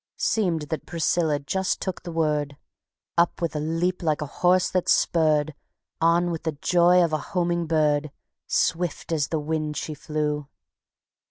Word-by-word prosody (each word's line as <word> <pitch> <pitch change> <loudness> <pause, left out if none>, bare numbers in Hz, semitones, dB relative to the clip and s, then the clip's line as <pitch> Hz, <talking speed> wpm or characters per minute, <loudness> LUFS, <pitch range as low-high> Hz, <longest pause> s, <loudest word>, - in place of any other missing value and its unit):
Seemed 180 -9 0
that 160 - -4
Priscilla 165 -2 +1
just 190 +7 -1
took 190 -2 -4
the 175 - -7
word; 150 -3 -1 0.6
Up 170 - +2
with 165 -3 -2
a - - 0
leap 165 +4 -1
like 155 -3 0
a 145 - -11
horse 180 +1 +4
that's 185 -1 +1
spurred, 155 -2 +2 0.5
On 170 +1 +3
with 165 - -4
the 160 -1 -2
joy 175 +4 +4
of 165 -2 0
a 155 - +1 0.2
homing 170 -1 +1
bird, 150 -2 +2 0.4
Swift 170 0 -1
as 150 -4 +1
the 160 - -1
wind 150 0 -2
she 155 - -4
flew. 150 -2 -3
160 Hz, 160 wpm, -25 LUFS, 150-175 Hz, 0.6 s, horse